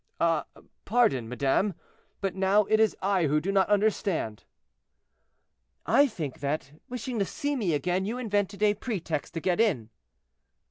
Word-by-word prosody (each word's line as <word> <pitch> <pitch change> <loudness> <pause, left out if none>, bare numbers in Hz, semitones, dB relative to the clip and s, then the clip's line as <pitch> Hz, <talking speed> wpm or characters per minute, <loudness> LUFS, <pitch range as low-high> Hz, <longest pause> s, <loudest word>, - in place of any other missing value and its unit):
"Ah, 165 -2 +2 0.4
pardon, 165 - +2
madame, 140 - +1 0.5
but 195 -2 -1
now 195 +2 +3
it 215 +2 +2
is 220 -1 +3
I 190 -4 +2
who 150 +2 +2
do 190 +6 -2
not 195 -1 +2
understand." 200 - 0 1.4
"I 285 - +5
think 160 - -6
that, 140 0 -2 0.2
wishing 250 -1 -4
to 200 - +2
see 290 +6 -2
me 195 - 0
again, 180 +6 0
you 225 +4 -3
invented 205 -4 -1
a 210 -1 +5
pretext 180 - -4
to - - -1
get 180 +3 0
in." 140 - +1
195 Hz, 150 wpm, -28 LUFS, 155-215 Hz, 1.4 s, I